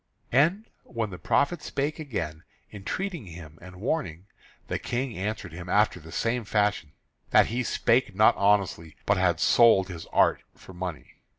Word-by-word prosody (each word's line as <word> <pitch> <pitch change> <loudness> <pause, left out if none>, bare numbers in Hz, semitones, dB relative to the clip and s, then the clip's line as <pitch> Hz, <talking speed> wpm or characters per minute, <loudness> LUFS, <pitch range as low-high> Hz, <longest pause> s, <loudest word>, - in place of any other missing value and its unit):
And 165 - +3 0.2
when 115 -4 -4
the 90 - -8
prophet 145 - +1
spake 145 +3 -3
again, 85 - -5 0.3
entreating 150 - -4
him, 80 -2 -11
and 90 +1 -12
warning, 95 - -3 0.4
the - - -2
King 125 0 -3
answered 100 -2 -4
him 90 +1 -8
after 105 -2 +2
the 80 0 -13
same 115 +5 -1
fashion, 105 -8 0 0.4
that - - +6
he 125 - 0
spake 115 -3 +1
not 110 +2 +5
honestly, 100 -6 +1
but 100 - +2
had 90 -3 +2
sold 105 -4 +5
his 85 -3 -8
art - - +3
for 95 - -14
money. 90 -3 -7
100 Hz, 160 wpm, -27 LUFS, 90-120 Hz, 0.4 s, that